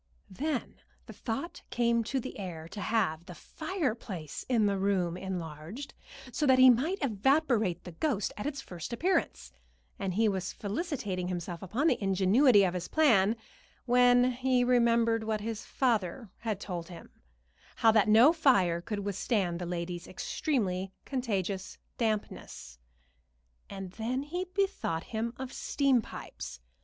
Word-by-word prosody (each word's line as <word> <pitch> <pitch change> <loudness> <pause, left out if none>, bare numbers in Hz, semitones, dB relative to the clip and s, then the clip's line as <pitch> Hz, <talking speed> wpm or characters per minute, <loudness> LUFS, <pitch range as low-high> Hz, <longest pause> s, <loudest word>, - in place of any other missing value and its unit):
Then 275 +5 -3 0.3
the - - -10
thought 270 +9 -5
came 235 -1 +2
to 265 +4 -1
the 255 -3 -7
heir 170 -5 -6
to 205 - -7
have 170 -8 0
the 180 - -9
fireplace 240 - -4
in 230 -4 +3
the 200 -1 +1
room 190 -3 +1
enlarged, 180 - -6 0.4
so 295 +4 0
that 260 -1 +6
he 255 0 +9
might 300 +11 +1
evaporate 240 - +2
the 180 - -8
ghost 210 - -1
at 210 - -4
its 285 -2 -4
first 175 -1 -7
appearance, 330 - 0 0.5
and 190 -2 -2
he 220 +2 +3
was 190 -3 -2
felicitating 205 - -3
himself 175 -1 -4
upon 220 - -1
the 250 -9 +2
ingenuity 200 +4 +5
of 180 -2 +1
his 180 -1 -4
plan, 225 -9 +4 0.5
when 245 0 +5
he 255 0 +1
remembered 235 -2 +3
what 220 -1 -1
his 225 0 -4
father 225 -4 -1
had 220 -4 -3
told 175 -4 -5
him 175 - -11 0.6
how 225 - +5
that 215 -1 +3
no 235 +9 +7
fire 195 - +3
could 210 +1 -4
withstand 195 -3 0
the 175 - -4
lady's 175 0 -4
extremely 190 -4 -2
contagious 200 -7 -2 0.2
dampness. 210 - -3 0.9
And 195 -2 -7
then 240 +6 -2
he 350 +5 -3
bethought 380 - -1
him 230 +2 -2
of 260 -1 -6
steam 275 -4 +2
pipes. - - -8
220 Hz, 145 wpm, -30 LUFS, 185-255 Hz, 0.9 s, he